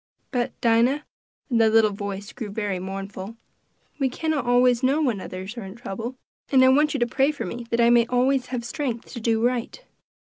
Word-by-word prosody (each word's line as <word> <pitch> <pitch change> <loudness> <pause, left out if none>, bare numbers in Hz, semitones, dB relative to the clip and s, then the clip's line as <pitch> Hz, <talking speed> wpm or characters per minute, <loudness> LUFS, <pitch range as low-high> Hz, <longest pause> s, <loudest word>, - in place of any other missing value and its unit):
But, 245 -2 -2
Dinah," 240 +6 +3 0.5
and 230 -1 +3
the 220 - +5
little 220 -1 +4
voice 200 0 -6
grew 225 -5 -6
very 205 -3 -2
mournful 195 +2 -6 0.6
"we 270 -2 +2
cannot 305 0 -2
always 245 0 +4
know 275 +3 +2
when 245 -10 0
others 190 +5 -7
are 235 - -5
in 190 +1 -9
trouble; 235 +2 -6 0.4
and 260 -2 +6
I - - +6
want 295 +2 +3
you - - 0
to - - +4
pray 270 +4 +2
for 295 - -5
me 235 0 -6
that 235 - 0
I 235 0 +5
may 235 -1 +5
always 255 +1 +1
have 245 -2 -4
strength 245 -4 -4
to 240 - -5
do 225 0 +1
right." 245 - -1
235 Hz, 205 wpm, -24 LUFS, 215-260 Hz, 0.6 s, and